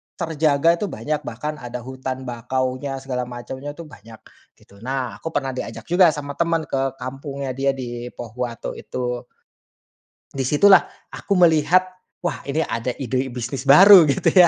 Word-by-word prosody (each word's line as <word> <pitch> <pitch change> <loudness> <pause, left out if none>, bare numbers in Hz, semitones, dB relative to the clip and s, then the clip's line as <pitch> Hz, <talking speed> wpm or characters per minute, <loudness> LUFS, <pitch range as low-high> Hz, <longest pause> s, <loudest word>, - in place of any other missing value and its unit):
terjaga 160 -1 +2
tuh 210 - -1
banyak, 150 +2 -3
bahkan 150 +6 -4
ada 120 0 -6
hutan 130 0 -5
bakaunya 130 +2 -3
segala 125 -2 -3
macamnya 130 +4 -7
tuh 170 - -8
banyak 110 -4 -14 0.4
gitu. 100 - -21
Nah 130 +1 -4
aku - - -7
pernah 135 -2 0
diajak - - -6
juga 175 +1 +6
sama 145 -1 -6
teman 165 -1 +1
ke 135 -1 -1
kampungnya 135 +1 -5
dia 135 0 +1
di 120 -2 -6
Pohuwato 120 0 -5
itu. 125 0 -4 1.1
Di 135 -2 -2
situlah 190 +6 +7 0.3
aku 200 - -2
melihat, 165 +3 +4 0.4
wah 175 - -2
ini 155 +3 0
ada 115 0 -3
ide 130 +1 -2
bisnis 130 +2 -5
baru 180 +2 +9
gitu 140 - +2
ya. 180 -2 +7
135 Hz, 155 wpm, -22 LUFS, 125-150 Hz, 1.1 s, baru